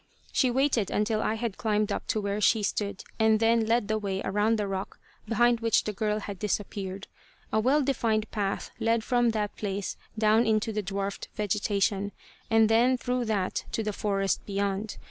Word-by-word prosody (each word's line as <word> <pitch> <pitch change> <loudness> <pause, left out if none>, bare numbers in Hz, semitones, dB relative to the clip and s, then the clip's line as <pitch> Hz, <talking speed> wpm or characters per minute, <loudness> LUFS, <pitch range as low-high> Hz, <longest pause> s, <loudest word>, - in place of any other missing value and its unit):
She 255 - +3
waited 250 -5 +1
until 215 +1 0
I 220 - 0
had 225 -3 -4
climbed 210 -1 +1
up - - -3
to 215 - 0
where 200 0 -2
she 215 +2 +3
stood, 200 -1 -2 0.2
and 220 -1 +4
then 225 0 +3
led 230 -2 +2
the 215 0 0
way 195 -2 -2
around 210 +3 +1
the 210 - -1
rock 195 0 -4 0.3
behind 240 +1 +3
which 230 -1 +2
the 210 - -3
girl 210 +1 -1
had 200 -2 -7
disappeared. 195 -1 -3 0.5
A 215 - +4
well 275 +6 +3
defined 225 -5 0
path 200 -2 -2
led 230 0 +1
from 240 0 +2
that 210 -2 -2
place 200 -1 -3 0.2
down 220 +2 +4
into 220 0 +1
the 210 - -1
dwarfed 195 0 -4
vegetation, 205 -1 0 0.4
and 225 -1 +5
then, 240 +4 +4
through 250 0 -1
that 205 -4 -1
to 225 - 0
the 210 -1 -2
forest 195 -1 0
beyond. 200 +1 -2
215 Hz, 185 wpm, -28 LUFS, 200-225 Hz, 0.5 s, and